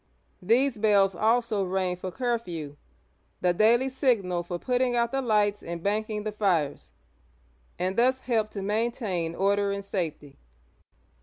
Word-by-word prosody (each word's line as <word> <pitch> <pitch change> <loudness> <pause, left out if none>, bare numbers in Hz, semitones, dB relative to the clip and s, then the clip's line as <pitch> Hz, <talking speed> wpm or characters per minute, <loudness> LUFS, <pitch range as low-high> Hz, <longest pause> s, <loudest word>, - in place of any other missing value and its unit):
These 235 +5 +2
bells 200 -3 +4
also 220 +1 +1
rang 185 -1 -1
for 185 +1 -6
"curfew, 180 - -3 0.3
— - - -42
the 180 -1 +3
daily 230 +7 +4
signal 230 - +1
for 175 0 -5
putting 250 +4 0
out 235 -1 +1
the 270 - 0
lights 210 -4 +1
and 170 0 -6
banking 210 +1 -1
the 215 - -3
fires, 175 -9 -1 0.4
— 60 0 -36 0.3
and 185 +1 -1
thus 255 +3 +2
helped 225 -4 -1
to 200 - -4
maintain 205 -6 -1
order 200 +1 +1
and 200 0 -4
safety. 160 -7 -4
205 Hz, 150 wpm, -27 LUFS, 180-235 Hz, 0.4 s, bells